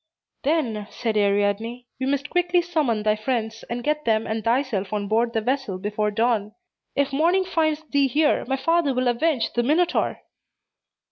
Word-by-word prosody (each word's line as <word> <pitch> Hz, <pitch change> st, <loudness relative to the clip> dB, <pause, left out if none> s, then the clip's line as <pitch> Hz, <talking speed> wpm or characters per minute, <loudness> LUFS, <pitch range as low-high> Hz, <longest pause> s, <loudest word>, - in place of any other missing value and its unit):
"Then," 240 Hz, -9 st, 0 dB
said 225 Hz, -3 st, -3 dB
Ariadne, 205 Hz, +4 st, +1 dB
"we 260 Hz, -, -1 dB
must 280 Hz, +1 st, -1 dB
quickly 355 Hz, 0 st, +2 dB
summon 295 Hz, -11 st, 0 dB
thy 215 Hz, 0 st, +3 dB
friends, 225 Hz, 0 st, -3 dB
and 240 Hz, 0 st, -3 dB
get 300 Hz, +2 st, 0 dB
them 220 Hz, -1 st, +1 dB
and 220 Hz, 0 st, -3 dB
thyself 230 Hz, -5 st, 0 dB
on 205 Hz, -1 st, -2 dB
board 230 Hz, +3 st, +1 dB
the 225 Hz, -, 0 dB
vessel 255 Hz, -4 st, -1 dB
before 210 Hz, +2 st, -1 dB
dawn. 215 Hz, -1 st, 0 dB, 0.4 s
If 280 Hz, -1 st, 0 dB
morning 345 Hz, +6 st, +3 dB
finds 315 Hz, -3 st, 0 dB
thee 285 Hz, -3 st, +2 dB
here, 300 Hz, +4 st, +2 dB
my 270 Hz, +1 st, 0 dB
father 325 Hz, -1 st, +1 dB
will 255 Hz, 0 st, +1 dB
avenge 255 Hz, +1 st, 0 dB
the 240 Hz, -, +1 dB
Minotaur." 315 Hz, +8 st, +1 dB
245 Hz, 165 wpm, -24 LUFS, 215-300 Hz, 0.4 s, thy